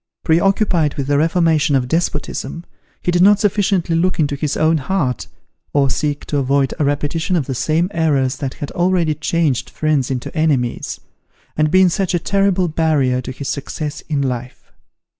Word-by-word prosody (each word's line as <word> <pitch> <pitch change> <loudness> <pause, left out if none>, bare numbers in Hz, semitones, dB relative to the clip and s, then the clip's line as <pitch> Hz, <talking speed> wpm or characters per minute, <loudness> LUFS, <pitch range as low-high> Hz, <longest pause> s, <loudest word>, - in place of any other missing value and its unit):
Pre 160 0 +3
occupied 190 -6 +1
with 140 - -2
the 145 +1 +1
reformation 160 -3 +2
of 125 -2 +1
despotism, 165 0 -2 0.4
he 175 - +1
did 175 0 +2
not 205 +2 +6
sufficiently 195 -4 +1
look 180 +2 +1
into 145 -2 +1
his 145 +1 -2
own 160 +1 +3
heart, 140 -5 -2 0.5
or 140 -2 +2
seek 145 0 -2
to 145 - -1
avoid 135 0 +1
a - - +2
repetition 145 +5 -1
of 155 -6 0
the 135 - -3
same 155 +7 +1
errors 140 -6 +1
that 135 -1 -4
had 145 - -6
already 175 -3 +1
changed 155 -3 -1
friends 155 -4 0
into 130 +2 -4
enemies, 145 -7 0 0.6
and 155 0 +2
been 185 +2 +5
such 180 +1 0
a - - +3
terrible 195 0 +1
barrier 150 -6 +1
to 130 - -6
his 135 +1 -7
success 150 +1 -4
in 145 -3 0
life. 125 -1 -5
155 Hz, 175 wpm, -18 LUFS, 140-175 Hz, 0.6 s, not